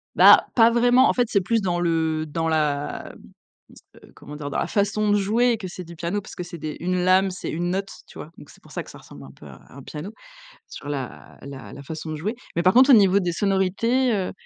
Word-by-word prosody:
Bah - - +7
pas 230 -1 +6
vraiment, 245 +2 +4
en - - +2
fait 245 -2 +1
c'est 200 - +1
plus 225 +4 0
dans 175 -3 -1
le 160 -2 -1
dans 165 +2 -2
la 150 -3 -2 1.0
comment 150 +1 -11
dire? 145 -1 -6
Dans - - -2
la - - -2
façon 210 +1 0
de 205 - +3
jouer 225 +5 +2
et 230 - 0
que 200 -3 -7
c'est 180 0 -8
du 170 0 -13
piano 175 +6 -3
parce - - -12
que 180 - -5
c'est 175 0 -9
des 155 -1 -6
une 180 +2 -2
lame, 185 +1 +3
c'est 180 - -6
une 175 +2 -2
note, 195 +1 -3 0.2
tu - - -15
vois, 155 - -9
donc 145 - -14
c'est - - -19
pour - - -18
ça - - -4
que - - -13
ça - - -12
ressemble 70 -1 -14
un 65 - -13
peu - - -17
à - - -13
un 140 - -11
piano 150 +8 -8 0.6
sur 145 - -9
la 135 -4 -7
la 140 -1 -10
la 140 - -10
façon 155 +2 -7
de 155 - -4
jouer, 205 +10 -3 0.2
mais - - +3
par 185 +2 +3
contre 260 +3 +6
au 270 - +8
niveau 200 -3 +5
des 175 -1 -1
sonorités, 205 +7 0
heu, 190 -3 -2
180 Hz, 255 wpm, -23 LUFS, 155-210 Hz, 1.0 s, au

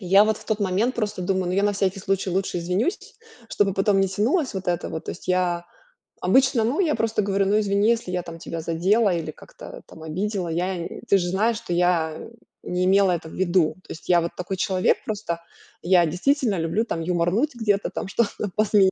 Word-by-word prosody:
Я 195 +2 +5
вот 215 -1 +1
в - - -15
тот 220 -1 -1
момент 205 +6 0
просто 205 -5 -2
думаю: 185 0 0
"Ну, 180 - -1
я 195 +2 +1
на 205 0 +2
всякий 195 0 -1
случай 195 -1 -1
лучше 185 -1 -1
извинюсь, 180 - -2 0.3
чтобы 200 -2 +1
потом 195 0 +2
не 195 - +2
тянулась 250 - 0
вот 190 -1 -5
это 175 -1 -1
вот". 160 -1 -6
То - - -4
есть - - -13
я 180 -1 +1 0.6
обычно, 260 +5 +3
ну, 245 - 0
я 325 -6 +2
просто 225 -1 0
говорю: 195 0 +1
"Ну, 210 +2 +3
извини, 200 +1 +2
если 230 -6 0
я 180 -1 -1
там 165 -1 -9
тебя 165 0 -5
задела 185 +6 +2
или 165 -2 -3
как-то - - -12
там 160 - -14
обидела. 185 +4 -3
Я 175 +1 -2 0.2
ты 200 - +6
же 175 -2 -1
знаешь, 215 +5 +1
что 200 -6 -5
я 170 -3 +1 0.5
не 180 +1 -1
имела 195 0 +4
это 170 -2 -2
в - - -11
виду". 175 -3 +2
То - - -11
есть 160 - -10
я 175 -1 +4
вот 170 - -3
такой 180 +2 -3
человек 185 0 +1
просто. 200 -6 -3 0.4
Я 175 0 +4
действительно 220 - +1
люблю 165 +8 0
там 165 - -3
юморнуть 180 - 0
где-то, 210 -4 0 0.2
что-то 205 -1 -1
посмеяться. 205 -3 +4
190 Hz, 210 wpm, -24 LUFS, 175-210 Hz, 0.6 s, ты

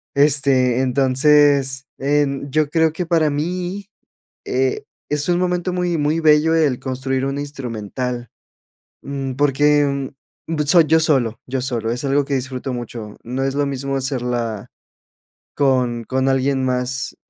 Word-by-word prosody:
Este, 135 -3 +3
entonces, 135 +1 +3
en 140 0 0
yo 150 +1 +1
creo 160 0 +2
que 180 +2 -3
para 160 -2 +2
mí, 180 +6 -3 0.6
eh, 130 0 -1 0.2
es 150 0 -1
un 175 - +3
momento 180 0 -1
muy, 180 -2 0
muy 155 +2 0
bello 155 +1 +4
el 150 -6 +2
construir 130 0 -2
un 135 +1 -2
instrumental, 125 -3 -5 0.7
mm, 135 -1 -4
porque, 145 0 +2 0.4
mm, 165 -1 -2
soy 165 +3 +5
yo 160 +1 +4
solo, 130 -8 +1
yo 130 +1 -2
solo 120 -4 -2
es 120 - -3
algo 140 +1 +2
que 140 - -6
disfruto 130 0 -3
mucho, 115 -3 -7
no 130 +3 -3
es 135 0 -1
lo 145 0 0
mismo 135 0 -3
hacerla 120 -5 -3 0.9
con 125 -4 +1
con 130 +3 0
alguien 135 0 +1
más 130 +1 -2
135 Hz, 140 wpm, -20 LUFS, 130-150 Hz, 0.9 s, soy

